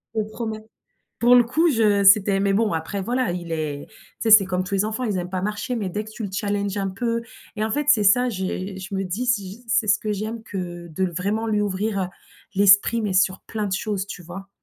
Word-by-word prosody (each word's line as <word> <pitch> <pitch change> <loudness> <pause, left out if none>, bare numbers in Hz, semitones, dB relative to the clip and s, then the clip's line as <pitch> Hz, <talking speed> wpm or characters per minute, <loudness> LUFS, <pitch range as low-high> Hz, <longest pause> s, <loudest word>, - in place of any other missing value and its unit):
Je - - +1
te 210 - -6
promets. 220 -1 -4 0.6
Pour 240 +1 +6
le 245 - +7
coup 325 +8 +2
je 210 -6 +2
c'était 195 0 +5
mais 195 0 +2
bon, 210 -2 +1
après 165 +5 -3
voilà, 245 -2 0
il 170 -2 -5
est 150 -3 -4
tu - - -23 0.3
sais, 225 - +1
c'est 215 -2 +9
comme 185 -1 -1
tous 185 +2 -6
les 195 - +2
enfants, 220 +4 -3
ils 205 -5 -1
aiment 180 0 -4
pas 185 0 -3
marcher 210 +5 -3
mais 210 -5 -2
dès 210 +4 -3
que 215 - -11
tu 215 +1 -8
le 200 - -3
challenges 200 -1 -2
un 195 -1 -1
peu 230 +4 -2 0.3
et 215 - -2
en 220 - -1
fait 295 +5 -1
c'est 220 -8 +5
ça 245 +6 +4
j'ai, 190 -2 -4
je 190 +1 -8
me 195 - -1
dis 195 +8 -3
si 210 -1 -1
c'est 220 -1 +2
ce 205 +2 +4
que 215 - -3
j'aime 215 +3 -4
que 175 -4 -6
de 165 +4 -2
le 175 - -5
vraiment 205 +6 -1
lui 210 -1 +1
ouvrir, 205 +1 -1
heu, - - -3 0.5
l'esprit 200 +3 +5
mais 205 -3 -2
sur 185 0 +2
plein 215 -2 -4
de 190 - -2
choses, 200 -1 -2
tu 195 - -8
vois? 195 +3 -9
205 Hz, 255 wpm, -23 LUFS, 190-220 Hz, 0.6 s, c'est